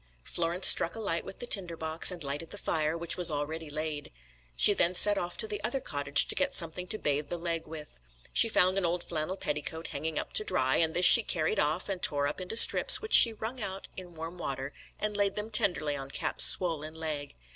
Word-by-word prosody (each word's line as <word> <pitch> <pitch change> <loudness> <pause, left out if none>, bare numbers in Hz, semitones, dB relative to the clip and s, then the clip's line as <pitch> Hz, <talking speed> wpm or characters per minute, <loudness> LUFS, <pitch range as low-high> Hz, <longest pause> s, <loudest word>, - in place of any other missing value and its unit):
Florence 170 - -3
struck 170 - +7
a - - -8
light 170 -6 -3
with - - -12
the - - -8
tinder 180 -8 -2
box, 160 0 +1
and 175 -3 -6
lighted 145 +4 -6
the 205 - -10
fire, 160 -3 -3
which 170 0 -4
was 180 -2 +6
already 155 +1 -6
laid. 155 0 -6 0.5
She 205 - +6
then 180 -2 -1
set 205 +3 +2
off 175 -2 -6
to 445 - 0
the 420 -1 -7
other 270 - -3
cottage 145 - +3
to - - -4
get 280 0 -2
something 170 +1 -3
to 215 - -4
bathe 145 -5 -3
the 175 - -5
leg 165 -1 -5
with. 155 - -11 0.3
She 230 - +4
found 185 -2 +1
an - - -5
old 175 +1 -4
flannel 165 +3 -5
petticoat 155 +2 -6
hanging 155 +2 -6
up - - -6
to - - +1
dry, 130 -10 -1
and 160 -1 -1
this 180 - +3
she 235 - +8
carried 165 -7 -3
off, 155 +4 -2
and 190 -3 -6
tore 145 -1 +1
up 145 +6 -5
into 185 +5 -5
strips, - - +6
which 440 +1 -5
she 230 - +9
wrung 225 +3 -8
out 190 0 -6
in 180 -2 -11
warm 165 +2 -9
water, 135 -2 -6 0.3
and 210 -1 -4
laid 200 -1 -1
them 210 +1 -7
tenderly 180 -9 +1
on 135 -1 -9
Cap's - - +2
swollen 160 -3 +2
leg. 155 -3 -7
170 Hz, 230 wpm, -27 LUFS, 155-195 Hz, 0.5 s, she